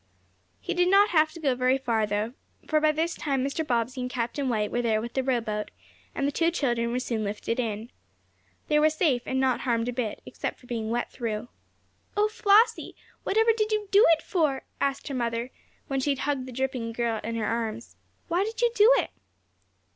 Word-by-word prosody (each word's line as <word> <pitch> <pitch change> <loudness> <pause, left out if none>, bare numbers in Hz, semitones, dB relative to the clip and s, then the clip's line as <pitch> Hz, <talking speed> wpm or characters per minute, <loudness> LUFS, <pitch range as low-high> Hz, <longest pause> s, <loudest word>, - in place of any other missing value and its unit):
He - - -3
did 355 0 +2
not 400 +2 +6
have 310 -2 +4
to 335 - -9
go 280 -5 +1
very 255 +1 +2
far, 230 -5 0
though, 210 +3 -2 0.3
for 310 -1 +2
by 310 0 +4
this 325 +2 -1
time 270 -3 -1
Mr. 280 +3 -2
Bobbsey 250 -2 -1
and 250 - -3
Captain 250 +2 -2
White 210 -3 0
were 240 - 0
there 225 -2 +1
with 235 +2 -6
the 265 - +1
rowboat, 230 -5 -1 0.5
and 275 - 0
the - - 0
two 330 +3 +2
children 240 -8 0
were 245 - -1
soon 230 -4 -2
lifted 210 +3 -3
in. 225 0 -3 0.8
They 300 -1 +3
were 310 +1 +5
safe, 305 -5 +1
and 260 - 0
not 260 -2 +2
harmed 235 -2 0
a - - -3
bit, 235 -3 -3
except - - -5
for - - -18
being 230 -3 -3
wet 240 +1 -2
through. 230 -1 -4 0.7
"Oh, 420 +1 +3
Flossie, 445 +1 +3 0.3
whatever 445 +3 +3
did 430 -1 0
you 425 -2 -1
do 405 +2 +7
it 315 - -2
for?" 300 -7 0 0.2
asked 275 -1 -1
her 280 - -4
mother, 235 0 -2 0.4
when 270 -1 -1
she 265 - -1
had 275 -2 0
hugged 275 -3 -1
the - - -7
dripping 260 -1 -2
little 230 - -5
girl 225 -2 0
in 230 +1 -3
her 225 -2 -1
arms. 230 0 -3 0.3
"Why 350 +2 +1
did 445 +2 -5
you 475 0 +3
do 435 +1 +6
it?" - - 0
260 Hz, 215 wpm, -27 LUFS, 230-310 Hz, 0.8 s, do